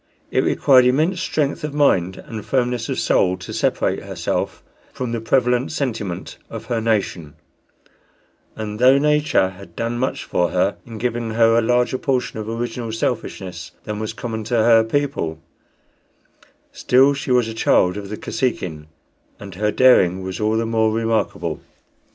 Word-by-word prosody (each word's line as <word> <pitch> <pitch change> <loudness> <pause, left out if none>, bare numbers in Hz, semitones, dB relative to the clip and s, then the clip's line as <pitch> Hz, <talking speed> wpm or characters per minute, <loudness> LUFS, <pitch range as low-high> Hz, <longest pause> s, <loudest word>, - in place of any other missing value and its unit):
It - - +2
required 130 -2 +4
immense 155 +8 +2
strength 145 -2 -1
of 150 -1 -4
mind 95 -11 +2
and 110 -3 -8
firmness 125 -3 -1
of - - -1
soul 90 0 +2
to 90 - -8
separate - - 0
herself - - -3 0.3
from 125 -2 -4
the 115 -1 -2
prevalent 125 +2 +1
sentiment 115 - -4
of - - -7
her 115 -2 -1
nation; 100 -9 -1 1.2
and 105 -1 -5
though 130 +2 +6
nature 150 -9 +2
had 90 -2 -14
done 115 +1 -2
much 130 - -2
for 90 -1 0
her - - 0
in 115 -2 -8
giving 115 -1 -2
her 115 0 +4
a 115 - +4
larger 125 +2 +1
portion 125 -4 -1
of 110 0 -5
original 115 0 -4
selfishness 90 -5 -4
than 105 0 -5
was 110 0 -3
common 110 -2 -5
to 120 - -1
her 115 0 +5
people, 115 - -1 1.3
still 135 +3 +4
she 140 -1 -5
was 125 -2 +3
a 115 - -5
child 90 -4 +2
of 100 -1 -6
the 105 - -5
Kosekin, 85 -12 -3 0.5
and 100 -1 -9
her 105 +4 0
daring 95 -8 +4
was 95 0 -5
all 110 +1 +1
the 115 - 0
more 110 -1 +1
remarkable. 115 0 -1
115 Hz, 160 wpm, -21 LUFS, 105-125 Hz, 1.3 s, though